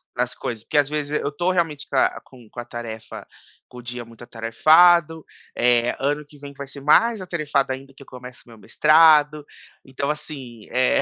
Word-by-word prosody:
nas - - -2
coisas, 115 -2 -6
porque 145 - -3
às 145 0 +1
vezes 150 0 -2
eu 145 - -2
estou 175 +5 -1
realmente 165 -5 -2
com - - -7
a - - +1
com 125 -4 -18
com 120 - -10
a 120 - -6
tarefa 115 -2 -9 0.4
com 125 - -15
o - - -10
dia 120 0 -7
muito 115 0 -15
atarefado, 155 +8 +3 0.3
eh, 120 0 +2
ano 145 +2 -2
que 145 0 -19
vem 140 0 -10
vai 140 0 -8
ser 140 - -11
mais 220 +10 +3
atarefado 150 -6 -2
ainda 135 +1 -11
que 140 - -19
eu - - -14
começo 125 0 -12
o - - -20
meu 115 - -14
mestrado, 155 +3 +4 0.4
então, 135 +2 -4
assim 135 -6 -7
é, 125 0 +2
140 Hz, 200 wpm, -22 LUFS, 120-150 Hz, 0.4 s, mestrado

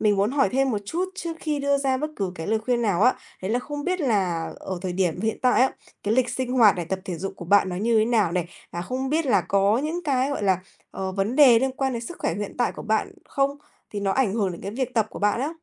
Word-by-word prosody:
mình 210 -2 +3
muốn 200 +4 +2
hỏi 275 0 +2
thêm 270 0 +2
một 210 - 0
chút 345 - -1
trước 335 -4 -5
khi 300 -2 -1
đưa 280 0 +2
ra 265 -1 +1
bất 305 +3 -3
cứ 190 -3 -2
cái 160 - -6
lời 220 +1 +1
khuyên 240 +2 0
nào 200 -3 +1
á. 250 - +5 0.3
Đấy 190 - -2
là 240 - +2
không 290 +3 -6
biết 365 0 -1
là 190 - 0
ở 185 -2 -4
thời 185 -2 -2
điểm 180 -2 0
hiện 220 +1 -1
tại 250 0 +4
á, 260 - +4 0.3
cái 210 +2 +1
lịch 250 -1 +2
sinh 250 +1 -2
hoạt 220 -6 +6
này, 175 - -2
tập 190 +3 -3
thể 180 -3 -4
dục 195 +1 -4
của - - -8
bạn 200 +2 +4
nó 180 - -4
như 225 +3 +2
thế 215 - +4
nào 220 -7 +2
này? 180 -1 0 0.3
Và 175 - -3
không 260 +6 -3
biết 315 +1 +1
là 245 - +4
có 200 +3 +2
những 315 +5 -2
cái, 270 -1 +1
gọi 280 - -3
là, 190 -2 +3 0.3
ờ, 190 0 -4
vấn 200 +7 -1
đề 255 -6 +8
liên 265 +2 0
quan 265 0 -1
đến 235 0 -3
sức 350 - -8
khỏe 165 - -1
hiện 205 0 -5
tại 245 - +1
của - - -8
bạn 220 - 0 0.2
không? 280 +1 0 0.3
Thì 205 - -4
nó 195 -1 0
ảnh 230 -7 +1
hưởng 200 -5 0
đến 170 - -9
cái 200 - -5
việc 250 +3 -3
tập 220 -2 +2
của - - -8
bạn 210 +3 +1
á. 280 - 0
225 Hz, 290 wpm, -24 LUFS, 195-265 Hz, 0.3 s, đề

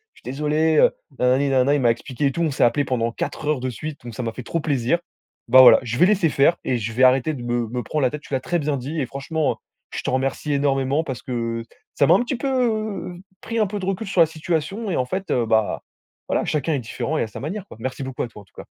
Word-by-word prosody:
je - - -20
suis - - -6
désolé, 150 +3 +1
heu, - - +6 0.3
nanani 130 +3 +3
nanana», 135 +1 +3
il 145 - 0
m'a 120 -2 +4
expliqué 125 +4 -3
et - - +1
tout. 170 - -3
On 165 - +2
s'est - - +1
appelé 130 +4 +3
pendant 120 -3 -1
4 130 - -5
heures 150 -2 +1
de 130 +1 -2
suite, 145 +4 -7
donc 120 -2 -8
ça 125 - -4
m'a 115 - -2
fait 125 - -7
trop 165 - -2
plaisir. 140 -1 +1 0.5
Bah 130 +2 +9
voilà, 130 - +9
je 120 -1 -3
vais 180 - +6
laisser 190 -5 +3
faire 145 +4 +3
et 125 - 0
je 115 0 -3
vais 130 +3 +2
arrêter 130 +4 +4
de 125 - -7
me 120 -1 -1
me 125 +2 -4
prendre 150 +7 -2
la 130 - +3
tête. 150 +3 -6
Tu 150 - -11
l'as 130 - +2
très 175 - -1
bien 150 -1 -1
dit 140 +6 -4
et 135 - 0
franchement, 140 +4 -2 0.3
je - - -4
te - - -3
remercie 135 +3 -1
énormément 140 +1 +1
parce 130 -8 -5
que 115 -2 -3 0.3
ça 140 - +3
m'a - - +7
un - - +4
petit 245 +2 -2
peu 230 -8 -1
f - - -13 0.2
pris 230 0 -3
un 215 - +3
peu 205 +2 -4
de 185 - -4
recul 195 +3 -2
sur 190 - -1
la - - +8
situation 165 +7 -3
et - - 0
en 125 - +1
fait, 190 +8 -4
heu, 120 -2 +2
bah, 110 -1 +1 0.4
voilà, - - 0
chacun 150 +1 -1
est 140 - 0
différent 125 +6 -3
et - - +1
à - - -3
sa 110 - -9
manière 185 +8 -5
quoi. - - -12
Merci 130 +3 -4
beaucoup 130 -1 -4
à - - -3
toi 110 -2 -13
en - - -18
tout - - -33
cas. - - -9
140 Hz, 285 wpm, -22 LUFS, 125-160 Hz, 0.5 s, Bah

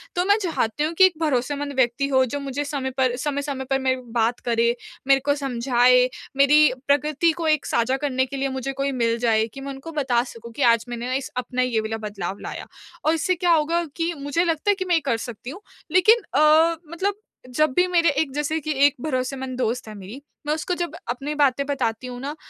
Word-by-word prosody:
तो 355 0 +1
मैं 405 +2 +4
चाहती 300 - -1
हूँ 315 +2 -1
कि 375 +3 +6
एक 375 - +3
भरोसेमंद 285 0 -1
व्यक्ति 260 +2 +1
हो 260 -2 +3
जो 270 +4 -4
मुझे 280 0 -3
समय 280 -2 -3
पर 255 -2 +2
समय-समय 280 0 -3
पर 270 - +2
मेरी 260 -1 0
बात 230 +1 +1
करे, 235 0 +1 0.3
मेरे 275 0 +5
को 285 - +3
समझाए, 250 -2 +3 0.3
मेरी 295 +2 +6 0.2
प्रकृति 300 +3 +2
को 330 -2 -2
एक 305 -2 +2
साझा 255 +3 +1
करने 260 -2 0
के 275 +1 -7
लिए 270 0 -1
मुझे 265 0 -3
कोई 275 +1 -1
मिल 235 -3 0
जाए 225 -2 +2
कि 275 - -9
मैं 275 0 -5
उनको 275 +4 -9
बता 265 -6 +1
सकूँ 235 -2 -11
कि 285 - -6
आज 230 -1 0
मैंने 240 +2 -3
इस 270 - -6
अपना 250 0 -2
ये 250 -3 +1
वाला 220 +1 -3
बदलाव 195 -2 -5
लाया। - - -6 0.4
और 315 - +4
इससे 345 +3 0
क्या 350 0 +1
होगा 330 +2 +1
कि 335 0 -1
मुझे 285 +4 0
लगता 330 +3 -1
है - - +1
कि 375 -1 -4
मैं 355 -2 +2
ये 325 - +2
कर 235 -4 +1
सकती 240 +1 -7
हूँ। 350 +9 -9 0.3
लेकिन 430 +7 +5
अ, 310 +3 +5
मतलब 380 +4 -1 0.4
जब 270 +2 +1
भी 360 +1 +4
मेरे 340 -2 +3
एक 285 0 0
जैसे 295 +2 -1
कि 310 0 -4
एक 285 - +3
भरोसेमंद 260 -2 -3
दोस्त 245 -1 -2
है 215 - -8
मेरी, 200 +8 -10 0.3
मैं 300 - +2
उसको 315 +4 -2
जब 340 -2 -6
अपनी 275 +5 -3
बातें 280 -2 +2
बताती 255 -4 -2
हूँ 245 -1 -7
ना 285 +3 -4
275 Hz, 220 wpm, -23 LUFS, 250-305 Hz, 0.4 s, कि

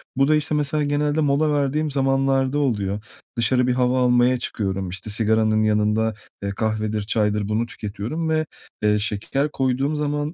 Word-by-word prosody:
Bu 135 +1 +3
da, 155 - +4
işte, 150 0 0
mesela 150 +1 0
genelde 145 +1 0
mola 150 +1 +2
verdiğim 145 +1 0
zamanlarda 135 0 +1
oluyor. 105 -6 -1 0.3
Dışarı 125 +2 +2
bir 125 - +2
hava 125 0 +1
almaya 125 +1 +3
çıkıyorum, 95 -5 -3
işte, 95 +3 -6
sigaranın 110 0 +2
yanında, 105 +1 +1 0.3
eee, 100 - -1
kahvedir, 110 +1 -1
çaydır 105 -1 0
bunu 110 +2 0
tüketiyorum 110 +11 -4
ve, 155 0 +1 0.4
eee, 105 0 +3
şeker 110 +8 -1
koyduğum 135 +3 0
zaman 150 +1 -2
125 Hz, 155 wpm, -22 LUFS, 105-145 Hz, 0.4 s, da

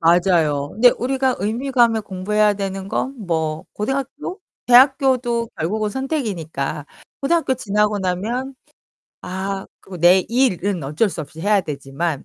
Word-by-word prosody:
맞아요. 165 -4 +3
근데 245 +3 +6
우리가 260 +1 0
의미감에 235 +1 +2
공부해야 210 +2 +1
되는 195 -1 -4
건 265 +6 -2
뭐 160 -2 -1
고등학교? 275 - -4 0.3
대학교도 250 -2 +4
결국은 210 +6 -1
선택이니까. 195 - -3 0.3
고등학교 315 -1 +1
지나고 210 -3 0
나면 220 +9 -2 0.7
아 190 +1 -4 0.2
그리고 190 - -10
내 175 +3 +6
일은 205 - +1
어쩔 155 +11 +1
수 170 - -6
없이 155 +2 -12
해야 205 +2 +3
되지만 140 +1 -4
205 Hz, 305 characters per minute, -20 LUFS, 175-250 Hz, 0.7 s, 근데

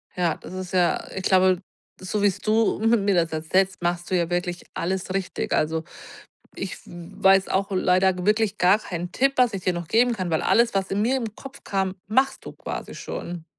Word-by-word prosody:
Ja, 175 -3 +1
das - - -11
ist 185 -1 -6
ja 180 -2 +2
ich 190 - -4
glaube, 185 -1 +3 0.4
so 185 +3 -3
wie's 200 -2 +2
du 220 +1 +1
mi 225 +2 +3
mir 200 -2 +1
das 165 -1 +1
erzählst, 185 +4 0
machst 175 0 -2
du 185 - +3
ja 170 -1 0
wirklich 175 0 -2
alles 185 +1 -2
richtig. 195 -1 -2
Also, 160 +1 0 0.7
ich 190 -1 -5
w - - -13 0.3
weiß 195 0 +5
auch 195 +1 0
leider 185 0 +2
wirklich 215 +1 +2
gar 185 +3 +5
keinen 175 -4 -6
Tipp, 270 +1 +2
was 250 -2 +4
ich 195 -2 -4
dir 185 - +1
noch 175 -2 -5
geben 240 +5 +3
kann, 185 -5 -3
weil 160 - +1
alles, 235 0 +3
was 195 -1 -1
in 200 +1 0
mir 250 +4 +2
im 225 -5 -4
Kopf 270 0 -11
kam, 190 -1 -1
machst 265 +6 +1
du - - -8
quasi - - -7
schon. 170 -2 -6
190 Hz, 210 wpm, -24 LUFS, 175-210 Hz, 0.7 s, weiß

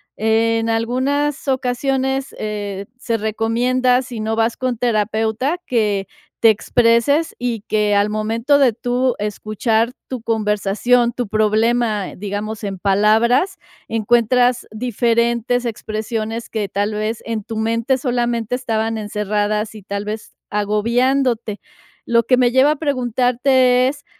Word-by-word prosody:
En 225 +1 +1
algunas 260 +6 0
ocasiones, 265 +1 -1
eh, 205 -2 -4
se 230 -2 -2
recomienda, 240 +4 +1
si 245 -4 -7
no 220 +1 -2
vas 225 0 +1
con 255 -2 -2
terapeuta, 225 - 0
que 210 -5 0 0.3
te 225 - +7
expreses 235 +8 +2
y 240 -3 -2
que 210 -1 +1
al 205 +1 +3
momento 230 +6 +1
de 265 -4 +5
tú 245 +2 0
escuchar 215 +3 -1
tu 255 -3 -5
conversación, 220 +2 +1
tu 245 -1 -4
problema, 215 0 +1
digamos, 210 +2 -5
en 195 -2 -4
palabras, 220 - +2 0.3
encuentras 240 +2 +2
diferentes 235 +1 0
expresiones 220 0 -4
que, 210 -3 -3
tal 205 +2 -1
vez, 215 +2 -3
en 225 -2 -3
tu 225 +2 -6
mente 230 +4 0
solamente 240 -3 -1
estaban 225 -3 -1
encerradas 210 +1 -1
y 215 - -10
tal 200 +1 -5
vez 215 +1 -6 0.2
agobiándote. 230 +2 0 0.5
Lo 235 0 +3
que 255 - +3
me 245 -1 +3
lleva 260 +4 +4
a - - 0
preguntarte 255 -2 +2
es, 285 +2 -5
230 Hz, 125 wpm, -19 LUFS, 215-250 Hz, 0.5 s, te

